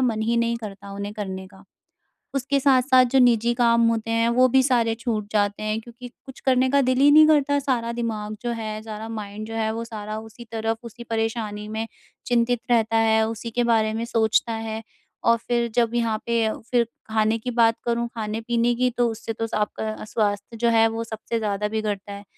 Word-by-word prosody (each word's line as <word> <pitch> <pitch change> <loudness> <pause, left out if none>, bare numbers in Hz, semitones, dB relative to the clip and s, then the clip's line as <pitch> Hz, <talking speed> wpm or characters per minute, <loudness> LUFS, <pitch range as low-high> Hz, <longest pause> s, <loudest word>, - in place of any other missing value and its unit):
मन 230 -4 +1
ही 235 +2 +1
नहीं 235 0 +1
करता 200 -3 -9
उन्हें 200 +1 -5
करने 190 -3 -5
का। 195 0 -18 0.7
उसके 275 +1 0
साथ-साथ 260 -1 +5
जो - - +6
निजी 235 -1 +4
काम 235 -1 +3
होते 225 0 -1
हैं, 230 0 +2
वो 255 +2 +4
भी 265 +1 +4
सारे 235 -4 +2
छूट 225 -3 -3
जाते 205 0 0
हैं 215 +1 -1
क्योंकि 240 +2 -11 0.2
कुछ 265 - -11
करने 260 0 +3
का 280 0 +4
दिल 255 0 +1
ही 285 +1 +7
नहीं 310 +1 +8
करता। 285 -2 +3
सारा 245 -4 -1
दिमाग 215 -3 -3
जो 240 - -2
है 215 -2 -4
सारा 220 0 -7
माइंड 215 -1 -6
जो 225 - -6
है 220 -1 0
वो 230 +1 -4
सारा 215 -1 -6
उसी 220 +2 -11
तरफ 225 0 -1
उसी 235 +1 -9
परेशानी 225 -2 -3
में 220 +1 -3 0.4
चिंतित 240 -1 +2
रहता 225 -1 +3
है, 220 0 +3
उसी 225 +1 -5
के 240 +1 0
बारे 220 -2 +2
में 230 +1 -2
सोचता 230 0 +1
है। 225 0 -4 0.4
और 230 0 +5
फ़िर 235 0 -1
जब 235 -1 +2
यहाँ 230 -2 0
पे 230 -2 +1 0.2
फ़िर 240 -2 +3 0.3
खाने 220 +1 +2
की 250 +3 -4
बात 230 -1 +3
करूँ 235 0 0
खाने-पीने 230 +2 -1
की 250 0 +2
तो 240 -1 +3
उससे 225 0 -5
तो 225 +1 -3
आपका 215 0 -2
अ, - - -8
स्वास्थ्य 210 0 -2
जो 235 0 +2
है 225 0 +5
वो 225 +1 -4
सबसे 225 +1 -4
ज़्यादा 210 -1 -1
बिगड़ता 210 -2 -3
है। 200 0 -9
225 Hz, 205 wpm, -24 LUFS, 215-240 Hz, 0.7 s, नहीं